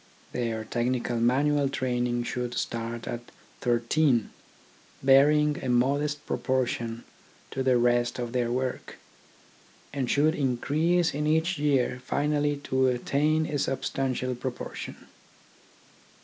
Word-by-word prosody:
Their 115 Hz, -3 st, -2 dB
technical 120 Hz, +1 st, -1 dB
manual 140 Hz, +4 st, +2 dB
training 125 Hz, -2 st, -1 dB
should 125 Hz, 0 st, -3 dB
start 115 Hz, 0 st, -3 dB
at 120 Hz, -, -3 dB, 0.4 s
thirteen, 120 Hz, +1 st, +2 dB, 0.7 s
bearing 145 Hz, +2 st, +4 dB
a 130 Hz, -, -2 dB
modest 145 Hz, +4 st, +1 dB
proportion 120 Hz, -3 st, -1 dB, 0.5 s
to 135 Hz, -, -3 dB
the 130 Hz, -1 st, +3 dB
rest 120 Hz, 0 st, +2 dB
of 120 Hz, -1 st, -4 dB
their 120 Hz, -2 st, 0 dB
work, 130 Hz, +1 st, -3 dB, 1.0 s
and 135 Hz, -3 st, -2 dB
should 150 Hz, +2 st, +3 dB
increase 155 Hz, +6 st, +1 dB
in 150 Hz, +1 st, -1 dB
each 160 Hz, +2 st, +1 dB
year 135 Hz, -4 st, +1 dB
finally 145 Hz, +2 st, 0 dB
to 130 Hz, -1 st, +2 dB
attain 150 Hz, +5 st, +1 dB
to -, -, -5 dB
a 145 Hz, -, 0 dB
substantial 130 Hz, -1 st, -1 dB
proportion. 125 Hz, 0 st, -6 dB
130 Hz, 115 wpm, -27 LUFS, 120-145 Hz, 1.0 s, bearing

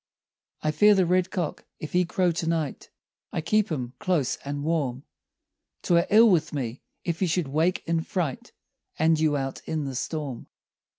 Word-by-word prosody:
I 155 Hz, -, +2 dB
fear 205 Hz, +7 st, +5 dB
the 190 Hz, -2 st, +3 dB
red 180 Hz, +1 st, +2 dB
cock—if 160 Hz, -3 st, -5 dB
he 180 Hz, 0 st, +3 dB
crow 180 Hz, +1 st, +1 dB
to 165 Hz, 0 st, -2 dB
night— 160 Hz, -4 st, -2 dB, 0.4 s
I -, -, -2 dB
keep 210 Hz, +5 st, +1 dB
him 125 Hz, -5 st, -3 dB
close 160 Hz, -8 st, 0 dB
and 145 Hz, 0 st, -5 dB
warm, 145 Hz, -5 st, -1 dB, 0.8 s
'Twere 170 Hz, 0 st, +3 dB
ill 225 Hz, +3 st, +7 dB
with 160 Hz, -4 st, +1 dB
me, 125 Hz, -3 st, -4 dB, 0.2 s
if 170 Hz, -1 st, -2 dB
he 185 Hz, -, +2 dB
should 170 Hz, -3 st, 0 dB
wake 160 Hz, +6 st, +1 dB
in 165 Hz, -1 st, +1 dB
fright 160 Hz, -6 st, -3 dB, 0.5 s
And 160 Hz, 0 st, +3 dB
you 155 Hz, -2 st, +2 dB
out 135 Hz, -1 st, -4 dB
in 155 Hz, -2 st, -2 dB
the 135 Hz, -, -4 dB
storm. 140 Hz, -1 st, -4 dB
160 Hz, 170 wpm, -26 LUFS, 145-180 Hz, 0.8 s, ill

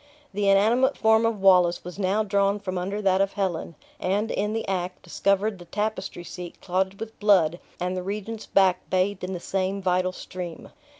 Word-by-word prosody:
The 200 Hz, 0 st, +1 dB
inanimate 230 Hz, +8 st, +4 dB
form 220 Hz, +1 st, +4 dB
of 220 Hz, -4 st, -2 dB
Wallace 180 Hz, -2 st, +5 dB
was 180 Hz, +2 st, -8 dB
now 200 Hz, +3 st, +1 dB
drawn 200 Hz, 0 st, +1 dB
from 190 Hz, -2 st, -4 dB
under 195 Hz, +4 st, -3 dB
that 190 Hz, 0 st, +3 dB
of 195 Hz, 0 st, 0 dB
Helen; 185 Hz, -5 st, -2 dB, 0.2 s
and, 205 Hz, +4 st, 0 dB
in 210 Hz, +1 st, -1 dB
the 225 Hz, -, -3 dB
act, 185 Hz, -1 st, -3 dB
discovered 200 Hz, +3 st, 0 dB
the 175 Hz, -, -11 dB
tapestry 205 Hz, -2 st, -3 dB
seat 175 Hz, 0 st, -8 dB
clotted 190 Hz, +1 st, -1 dB
with 225 Hz, 0 st, -8 dB
blood, 180 Hz, -6 st, +4 dB, 0.2 s
and 180 Hz, +1 st, -2 dB
the 185 Hz, -, -2 dB
regent's 210 Hz, +3 st, -5 dB
back 190 Hz, -2 st, +2 dB
bathed 190 Hz, +1 st, 0 dB
in 185 Hz, +1 st, -3 dB
the 180 Hz, -, -4 dB
same 190 Hz, +2 st, -2 dB
vital 185 Hz, -1 st, +1 dB
stream. 180 Hz, -2 st, -8 dB
195 Hz, 185 wpm, -25 LUFS, 180-205 Hz, 0.2 s, Wallace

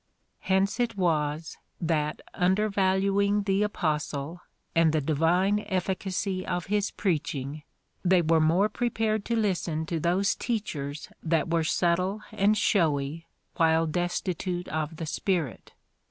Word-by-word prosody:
Hence 195 Hz, +4 st, +1 dB
it 230 Hz, -3 st, 0 dB
was, 160 Hz, -3 st, 0 dB, 0.2 s
that 155 Hz, -3 st, -1 dB
imdervaluing 200 Hz, +1 st, +2 dB
the 195 Hz, 0 st, +2 dB
Aj)ostle, 155 Hz, -5 st, -2 dB, 0.3 s
and 165 Hz, -2 st, +4 dB
the 155 Hz, -, +3 dB
divine 165 Hz, +7 st, +2 dB
efficacy 190 Hz, 0 st, -1 dB
of 175 Hz, -1 st, -2 dB
his 205 Hz, 0 st, 0 dB
preaching, 155 Hz, -6 st, -2 dB, 0.4 s
they 180 Hz, -1 st, +4 dB
were 160 Hz, 0 st, +3 dB
more 170 Hz, +6 st, +4 dB
prepared 220 Hz, -2 st, -1 dB
to 235 Hz, -, 0 dB
listen 180 Hz, -7 st, 0 dB
to 165 Hz, 0 st, -2 dB
those 180 Hz, +5 st, +2 dB
teachers 155 Hz, -, -4 dB
that 165 Hz, 0 st, 0 dB
were 165 Hz, -1 st, +2 dB
subtle 180 Hz, +6 st, +1 dB
and 215 Hz, 0 st, +2 dB
showy, 160 Hz, -5 st, +1 dB, 0.3 s
while 165 Hz, -1 st, +4 dB
destitute 175 Hz, +1 st, -2 dB
of 155 Hz, +1 st, -2 dB
the 165 Hz, -, -5 dB
Spirit. 165 Hz, -, -2 dB
175 Hz, 125 wpm, -27 LUFS, 160-200 Hz, 0.4 s, and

